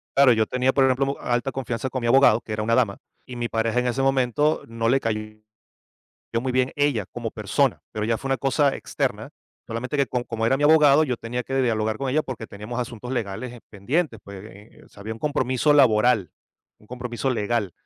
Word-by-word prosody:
Claro, 135 Hz, -2 st, +6 dB
yo 110 Hz, -1 st, +2 dB
tenía, 130 Hz, +1 st, +1 dB
por 135 Hz, -, +3 dB
ejemplo, 135 Hz, +2 st, +1 dB
alta 120 Hz, +2 st, -1 dB
confianza 130 Hz, -1 st, -3 dB
con 130 Hz, 0 st, -4 dB
mi 120 Hz, -, -1 dB
abogado, 120 Hz, -3 st, +5 dB
que -, -, -10 dB
era 105 Hz, 0 st, -2 dB
una 115 Hz, +2 st, 0 dB
dama. 115 Hz, -6 st, +1 dB, 0.3 s
Y 125 Hz, -, -8 dB
mi 120 Hz, -1 st, -3 dB
pareja, 115 Hz, +1 st, 0 dB
en 125 Hz, -, 0 dB
ese 125 Hz, +2 st, -1 dB
momento, 135 Hz, +3 st, +1 dB
no 115 Hz, 0 st, -1 dB
le 135 Hz, +2 st, +3 dB
cayó 110 Hz, -2 st, -2 dB, 1.2 s
muy 130 Hz, +1 st, -2 dB
bien, 130 Hz, +1 st, +1 dB
ella 145 Hz, -9 st, +1 dB
como 115 Hz, -2 st, -5 dB
persona, 110 Hz, +5 st, 0 dB
pero 105 Hz, 0 st, -2 dB
ya 115 Hz, 0 st, 0 dB
fue 135 Hz, -, -6 dB
una 135 Hz, -, +1 dB
cosa 140 Hz, +1 st, +1 dB
externa. -, -, -3 dB, 0.4 s
Solamente, 125 Hz, +6 st, -4 dB
que 140 Hz, -, +3 dB
co 125 Hz, -1 st, -2 dB
como 115 Hz, -1 st, -2 dB
era 135 Hz, -, +3 dB
mi 145 Hz, -, -2 dB
abogado, 150 Hz, -1 st, +6 dB
yo 125 Hz, -, -1 dB
tenía 120 Hz, +2 st, -4 dB
que 135 Hz, -, -4 dB
dialogar 110 Hz, -2 st, 0 dB
con 135 Hz, -1 st, -2 dB
ella, 155 Hz, +4 st, +2 dB
porque 120 Hz, -5 st, -7 dB
teníamos 105 Hz, +4 st, -6 dB
asuntos 125 Hz, 0 st, -5 dB
legales, 120 Hz, +1 st, -4 dB
eh, 120 Hz, -, -11 dB
pendientes, 120 Hz, -, -2 dB
pues, 100 Hz, -1 st, -10 dB
eh, 105 Hz, 0 st, -15 dB
o -, -, -22 dB
sea, 100 Hz, -, -15 dB
había 110 Hz, +2 st, -5 dB
un 115 Hz, -, -13 dB
compromiso 145 Hz, 0 st, +1 dB
laboral, 110 Hz, -, +4 dB, 0.5 s
un 105 Hz, -, -22 dB
compromiso 125 Hz, +1 st, -4 dB
legal. 110 Hz, -4 st, -1 dB
125 Hz, 215 wpm, -24 LUFS, 110-135 Hz, 1.2 s, Claro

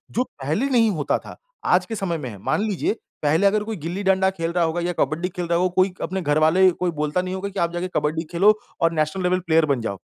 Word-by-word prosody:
जो 250 Hz, -, +2 dB
पहले 155 Hz, -, -3 dB
नहीं 230 Hz, -4 st, +4 dB
होता 150 Hz, -6 st, 0 dB
था -, -, -12 dB, 0.3 s
आज 180 Hz, 0 st, +3 dB
के 225 Hz, -, -5 dB
समय 185 Hz, -5 st, -2 dB
में 130 Hz, -5 st, -5 dB
है, 100 Hz, -, -9 dB
मान 100 Hz, -, -1 dB
लीजिए 210 Hz, -1 st, 0 dB, 0.3 s
पहले 160 Hz, +7 st, +3 dB
अगर 210 Hz, +1 st, +1 dB
कोई 220 Hz, 0 st, -4 dB
गिल्ली 170 Hz, +6 st, -4 dB
डंडा 190 Hz, 0 st, +3 dB
खेल 165 Hz, -2 st, -3 dB
रहा 175 Hz, -1 st, +2 dB
होगा 165 Hz, +2 st, -1 dB
या 175 Hz, +1 st, -1 dB
कबड्डी 160 Hz, +6 st, 0 dB
खेल 180 Hz, -1 st, -4 dB
रहा 170 Hz, 0 st, +2 dB
होगा 180 Hz, 0 st, +1 dB
कोई 185 Hz, 0 st, +3 dB
अपने 190 Hz, +1 st, -2 dB
घर 145 Hz, -1 st, +1 dB
वाले 180 Hz, +4 st, +5 dB
कोई 175 Hz, 0 st, -2 dB
बोलता 150 Hz, +3 st, -1 dB
नहीं 185 Hz, +1 st, -4 dB
होगा 200 Hz, +1 st, -4 dB
की 195 Hz, -, -5 dB
आप 170 Hz, 0 st, +1 dB
जाके 175 Hz, +1 st, -2 dB
कबड्डी 155 Hz, +2 st, 0 dB
खेलो 195 Hz, +5 st, +5 dB, 0.3 s
और 165 Hz, 0 st, +4 dB
नेशनल 155 Hz, +4 st, -1 dB
लेवल 180 Hz, +1 st, +2 dB
प्लेयर 165 Hz, -2 st, +2 dB
बन 135 Hz, -5 st, 0 dB
जाओ। 100 Hz, -3 st, -3 dB
175 Hz, 260 wpm, -23 LUFS, 160-190 Hz, 0.3 s, वाले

